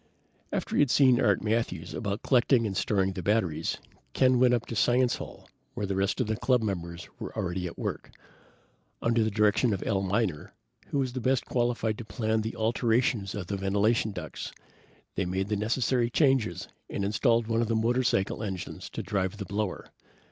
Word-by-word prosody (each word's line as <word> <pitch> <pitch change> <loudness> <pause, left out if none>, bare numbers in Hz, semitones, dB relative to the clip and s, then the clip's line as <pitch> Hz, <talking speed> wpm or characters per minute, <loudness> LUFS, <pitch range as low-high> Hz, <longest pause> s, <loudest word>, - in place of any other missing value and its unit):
After - - -2
he - - +3
had 145 - +3
seen 130 -2 +5
Art 100 -1 +2
Matthews 110 -6 -1
about 100 -1 -3
collecting 125 -2 +3
and 100 -3 -2
storing 95 -1 +1
the 95 - -5
batteries, 90 -5 0 0.4
Ken 130 -1 +4
went 125 -1 +5
up 120 - -3
to 115 - -6
Science 125 +2 +3
Hall - - -10 0.3
where 105 - -2
the 100 -1 -2
rest 95 +5 0
of 125 - +2
the 110 +1 -1
club 125 +1 +2
members 85 -5 -4
were - - -7
already 90 0 -2
at 85 - -9
work. - - -4 0.9
Under 115 -1 +3
the 110 - +1
direction 105 +2 +2
of 95 - -6
Al 100 -3 +1
Miner, 95 -5 -1 0.3
who - - -2
was 130 -3 0
the 130 - -3
best 130 +1 +1
qualified 120 -3 0
to - - -5
plan 110 +1 -1
the 110 +1 -4
alterations 115 -2 +1
of 100 -3 -4
the 100 +3 -3
ventilation 105 +3 +1
ducts, 90 -5 -6 0.6
they 95 - -1
made 95 +2 -2
the 105 - +1
necessary 120 +3 +1
changes 130 - +2 0.2
and 100 - -2
installed 115 +3 +2
one 115 +1 +1
of 115 - 0
the 115 - 0
motorcycle 115 -3 +1
engines 95 -5 -5
to - - -5
drive 95 -1 -1
the 100 - -5
blower. 105 -1 -3
110 Hz, 190 wpm, -28 LUFS, 95-120 Hz, 0.9 s, seen